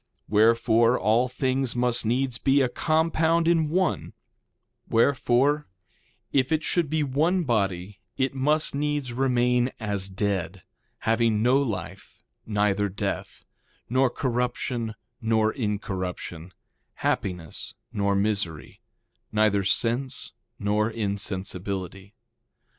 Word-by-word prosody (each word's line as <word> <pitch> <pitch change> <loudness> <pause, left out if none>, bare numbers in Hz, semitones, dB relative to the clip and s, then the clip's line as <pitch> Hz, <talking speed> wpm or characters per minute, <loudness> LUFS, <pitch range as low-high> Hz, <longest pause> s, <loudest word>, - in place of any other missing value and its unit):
Wherefore, 115 +2 +4
all 115 +5 +3
things 130 0 0
must 120 -2 +2
needs 125 +1 0
be 135 +1 +3
a 130 - +2
compound 160 +3 +1
in 165 -3 +3
one; 185 +3 0 0.8
wherefore, 135 +4 +2 0.7
if 135 0 +2
it 160 0 +1
should 170 -5 0
be 155 0 +1
one 160 +7 +1
body 100 - -1 0.2
it 130 0 0
must 150 +4 +1
needs 145 -3 -1
remain 125 -1 +2
as 100 -3 -2
dead, 95 -2 -2 0.4
having 115 -1 +2
no 125 +3 +4
life 95 -7 -5 0.2
neither 105 -1 +1
death, 95 - -4 0.5
nor 130 +1 +3
corruption 120 -2 -2 0.3
nor 110 -1 +2
incorruption, 95 - -4 0.5
happiness 90 -4 -3 0.2
nor 100 -1 +1
misery, 100 -6 -2 0.5
neither 105 -2 +2
sense 120 +6 -1 0.3
nor 105 +1 +1
insensibility. 100 -2 -4
115 Hz, 105 wpm, -26 LUFS, 100-135 Hz, 0.8 s, Wherefore